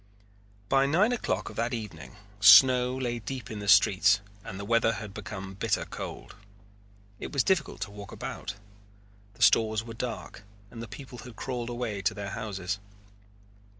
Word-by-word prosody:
By 135 +3 +3
nine 185 - +3
o'clock 245 - -2
of - - -13
that 115 +2 0
evening 80 - -8 0.2
snow 125 +5 +7
lay 120 -2 -2
deep 130 +2 -6
in 110 - -5
the 100 - -6
streets 100 +1 +5 0.2
and 95 - -7
the 100 - -5
weather 115 +1 +3
had 105 -2 -7
become 95 -2 -7
bitter 100 +1 -1
cold. - - -8 0.9
It - - -6
was 140 -4 +2
difficult 185 -6 0
to 100 - -4
walk 100 -1 -10
about. - - -6 0.8
The 115 - -1
stores 110 +1 +4
were 115 0 -8
dark 115 -5 -6 0.3
and 115 - -8
the 115 - -6
people 125 +3 -10
had 120 -1 -10
crawled 120 +1 -4
away 120 -5 -3
to 95 +4 0
their 100 -2 -5
houses. 100 -4 -4
110 Hz, 165 wpm, -28 LUFS, 100-125 Hz, 0.9 s, snow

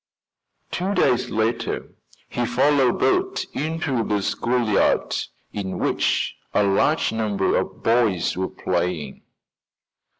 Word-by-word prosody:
Two 190 +3 -1
days 125 0 +2
later 110 +2 -2 0.3
he 120 - -2
followed 130 +1 +3
Bert 380 0 +1
into 150 -6 -1
the 105 -2 -1
schoolyard, 120 -3 +1 0.4
in 95 -2 -4
which - - 0 0.2
a - - +4
large 100 +11 +2
number 105 -3 0
of - - -2
boys 115 -6 +2
were 95 +1 -2
playing. 90 -4 -2
115 Hz, 105 wpm, -23 LUFS, 100-140 Hz, 0.4 s, a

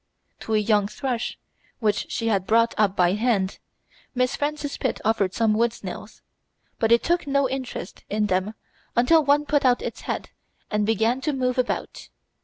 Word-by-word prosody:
To 220 - -2
a - - +5
young 210 -1 +2
thrush, 240 +2 -3 0.4
which 210 -3 -1
she 230 - -2
had 195 -3 0
brought 230 +1 +3
up 205 -3 +2
by 180 -1 +3
hand, 210 -3 0 0.6
Miss 250 +1 +1
Frances 290 0 -2
Pitt 260 - -2
offered 205 -4 +1
some 225 -2 +2
wood 230 +2 +2
snails, - - -9 0.6
but 225 0 +1
it 235 - +5
took 345 -2 0
no 280 -1 +2
interest 255 -7 -6
in 210 +1 +1
them 190 +2 -1 0.4
until 310 +7 +5
one 290 +1 +3
put 290 -1 +1
out 250 -2 +3
its - - -5
head - - -4 0.4
and 210 -1 +1
began 225 +4 +1
to 300 +1 -1
move 255 -1 0
about. 250 - -3
230 Hz, 175 wpm, -24 LUFS, 210-265 Hz, 0.6 s, a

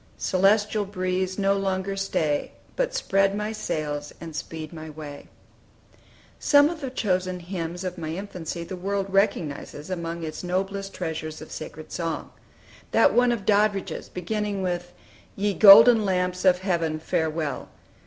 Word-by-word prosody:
Celestial 205 +3 +2
breeze, 185 -1 -2
no 195 -1 +2
longer 195 0 -1
stay! 160 -6 -1 0.2
But - - -1
spread 195 - +2
my 210 +1 -2
sails, 150 -8 -3
and 165 -2 -8
speed 155 +2 -6
my 160 -1 -8
way!" 150 -2 -9 1.1
Some 290 0 +5
of 330 -2 -8
the 270 - -3
chosen 185 -7 -1
hymns 175 0 -5
of 180 -1 -4
my 160 0 -4
infancy 180 -3 -5
the 185 - -6
world 195 +1 -3
recognizes 175 -5 -1
among 170 -1 -4
its 155 +2 -5
noblest 195 +2 -2
treasures 160 -2 -4
of 155 - -11
sacred 155 0 -8
song. 165 -2 -3 0.6
That - - +4
one 245 0 +4
of 220 -5 -3
Doddridge's, 205 -1 +1
beginning 200 +2 -3
with 175 -1 -2 0.4
"Ye 205 +1 0
golden 220 +3 +9
lamps 180 -1 0
of 180 -1 +5
heaven, 165 -4 0
farewell!" 160 -2 -2
185 Hz, 145 wpm, -25 LUFS, 165-200 Hz, 1.1 s, golden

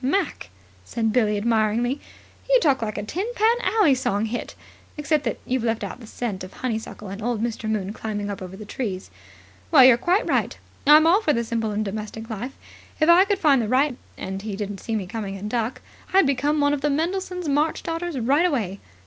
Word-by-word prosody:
"Mac," 300 - -1 0.3
said 225 - -1
Billie 215 -4 +2
admiringly, 230 +4 +1 0.5
"you - - +6
talk 280 - +2
like 215 -2 -3
a 205 - -3
Tin 365 - -3
Pan 450 +2 +3
Alley 425 - +3
song 220 -5 0
hit, 235 +2 -5 0.4
except 300 0 +1
that 230 - -1
you've 255 -2 -1
left 225 -1 -1
out - - -6
the 230 - -12
scent 215 -5 -4
of 185 - -9
honeysuckle 225 -4 -5
and 200 +3 -7
Old 235 0 -1
Mister 230 -1 -3
Moon 210 -2 -2
climbing 210 -2 -4
up 200 -1 -5
over 185 +1 -8
the 215 - -9
trees. 200 -4 -5 0.6
Well, 275 -6 +8
you're 255 -2 +7
quite 360 - +1
right. - - 0 0.3
I'm 305 +2 +8
all 360 +6 +5
for 305 -8 +2
the 235 - 0
simple 225 -1 -2
and 210 +1 -1
domestic 215 +2 -5
myself. 235 +4 -5 0.5
If 310 +1 +3
I 355 +3 +7
could 405 0 0
find 290 -8 +4
the 220 - -2
right 275 +4 +3 0.3
man, - - -6
and 190 +1 -4
he 210 -1 -5
didn't 205 -1 -5
see 225 - -3
me 205 -3 -2
coming 200 -1 -5
and 200 +2 -6
duck, 230 +2 -2 0.3
I'd 385 -2 +5
become 285 +2 +1
one 285 0 +3
of 290 - -2
the 295 - +1
Mendelssohn's 360 +3 -2
March 295 +3 +1
Daughters 330 -2 -3
right 280 +9 +3
away. 210 - -2
240 Hz, 215 wpm, -24 LUFS, 215-300 Hz, 0.6 s, Well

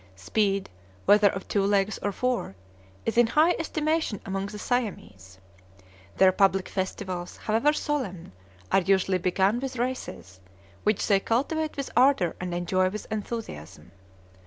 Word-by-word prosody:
Speed, 195 - 0 0.4
whether 205 0 +6
of 195 0 -6
two 200 - +1
legs 200 +1 +1
or 205 - -1
four, 245 - -2 0.5
is 225 +1 +1
in 240 - +6
high 310 +7 +4
estimation 310 - -1
among 195 0 -3
the 210 +1 -8
Siamese. 185 - -3 0.8
Their 190 -1 +6
public 195 0 +2
festivals, 185 -2 -4
however 225 +7 +2
solemn, 260 - -3 0.4
are 195 - +4
usually 190 0 +2
begun 190 +5 +1
with 260 -1 -5
races, 240 - -4 0.4
which 210 -1 +1
they 200 -2 +4
cultivate 300 +9 -1
with 275 - -4
ardor 250 - +4
and 180 -1 -3
enjoy 185 +2 +1
with 215 +3 -6
enthusiasm. 95 - -6
200 Hz, 135 wpm, -26 LUFS, 185-245 Hz, 0.8 s, whether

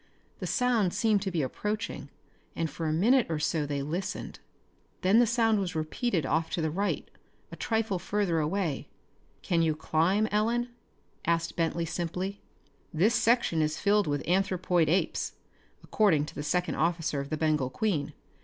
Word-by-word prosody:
The - - -4
sound 240 -8 +1
seemed 215 -3 +2
to 195 - -2
be 170 -5 -1
approaching 210 - -3 0.5
and 160 -3 -2
for 165 +2 -3
a - - +1
minute 230 +10 +3
or 160 - -1
so 150 0 0
they 140 -1 -2
listened. 170 +7 -4 0.6
Then 190 +5 +5
the 240 - +5
sound 225 -2 +3
was 180 -3 -3
repeated 160 - -1
off 160 +4 0
to 175 - 0
the 160 - 0
right, 200 +5 -1 0.4
a - - -7
trifle 220 -4 -1
further 195 -4 0
away. 160 -1 -1 0.6
"Can 170 -2 +1
you 160 -2 +2
climb, 165 +7 +2
Ellen?" 230 +4 +1 0.6
asked 165 0 0
Bentley 165 0 0
simply. 180 +4 -3 0.5
"This 190 +9 +3
section 230 -9 +2
is 155 0 0
filled 205 -1 +2
with 145 -1 -2
anthropoid 180 -3 +2
apes, 185 +4 0 0.5
according 170 -9 +2
to 150 - -10
the - - -5
second 180 +4 0
officer 165 -3 0
of 140 0 -5
the 155 - -2
Bengal 150 -4 +1
Queen. 170 -2 -1
175 Hz, 165 wpm, -29 LUFS, 155-210 Hz, 0.6 s, Then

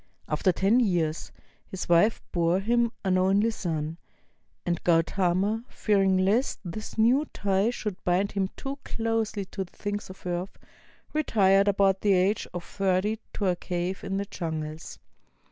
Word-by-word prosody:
After 185 - +2
ten 195 +7 +3
years, 170 -8 0 0.4
his 190 - -5
wife 175 +6 +3
bore 170 0 +2
to - - -12
him 235 0 +2
an 185 -1 +3
only 200 +4 +3
son; 165 -5 -3 0.7
and 175 -1 -1
Gautama, 185 +5 +2
fearing 195 -3 +2
lest 200 +8 +2
this 215 +7 -6
new 245 +7 +4
tie 195 +2 +1
should 210 -5 -5
bind 180 +3 +1
him 195 -2 -1
too 275 +1 -5
closely 225 -3 -2
to 190 +1 -4
the 175 - -18
things 205 -1 -4
of 185 - -12
earth, 180 +1 -3 0.6
retired 200 -10 +3
about 195 -1 +3
the 205 -2 +3
age 190 +3 +2
of 175 -1 -5
thirty 195 +3 0
to 205 - -2
a 180 -2 +2
cave 180 +1 -3
in 195 - -2
the 200 - -2
jungles. 160 -4 -5
195 Hz, 155 wpm, -27 LUFS, 180-210 Hz, 0.7 s, new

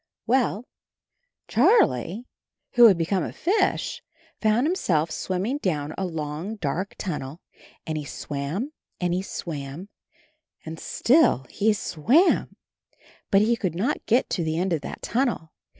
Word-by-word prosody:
Well, 240 -3 +1 0.8
Charlie, 230 - +3 0.5
who 240 - +7
had 195 -5 +5
become 175 +3 0
a - - -4
fish, 385 +6 0 0.4
found 220 +4 +3
himself 170 - +1
swimming 195 - -2
down 155 - -2
a 190 - -2
long 160 +5 -4
dark 180 +1 -3
tunnel, 150 -4 -5 0.5
and 155 -1 -2
he - - -5
swam 145 - -4 0.3
and 175 -1 0
he 180 - 0
swam 160 -1 -6 0.8
and 160 0 -7
still 255 - +3
he 220 +2 +2
swam, 235 - +2 0.7
but 195 -1 +5
he 235 +2 +3
could 185 -8 -3
not 230 +12 -1
get 240 +4 +3
to 175 - 0
the 160 0 -1
end 180 +1 0
of 155 - -1
that - - -8
tunnel. 235 -11 -1
185 Hz, 135 wpm, -25 LUFS, 160-230 Hz, 0.8 s, who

